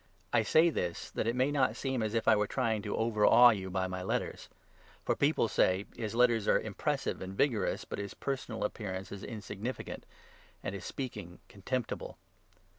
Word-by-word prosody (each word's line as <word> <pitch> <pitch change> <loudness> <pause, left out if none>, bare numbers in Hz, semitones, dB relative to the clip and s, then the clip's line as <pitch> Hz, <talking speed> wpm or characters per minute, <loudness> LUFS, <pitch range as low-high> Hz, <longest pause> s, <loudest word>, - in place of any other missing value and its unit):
I - - +5
say 160 +9 +4
this, 85 - -3
that - - -2
it 115 - +1
may 130 +3 +2
not 130 -6 +2
seem 130 0 -2
as 110 +1 -1
if 115 - 0
I 110 - +7
were 105 0 +1
trying 110 +1 0
9 - - -5
to 105 -1 -3
overawe 115 +2 +6
you 95 -4 -3
by 95 0 -1
my 90 0 -4
letters. 90 - -3 0.6
For - - +2
people 140 -4 +2
say 95 -1 +2
" - - -25
His 110 -1 -4
letters 120 -3 +3
are - - +5
10 - - -4
impressive - - -2
and 95 +1 -6
vigorous, 115 -9 +1
but - - -5
his 100 0 -5
personal 130 -4 -3
appearance 95 -3 -4
is 100 -1 -7
in 110 -4 -6
significant 110 +7 -6 0.6
and - - -3
his 100 - -6
speaking 105 -10 -6
contemptible." 120 +5 -4
110 Hz, 195 wpm, -32 LUFS, 100-125 Hz, 0.6 s, I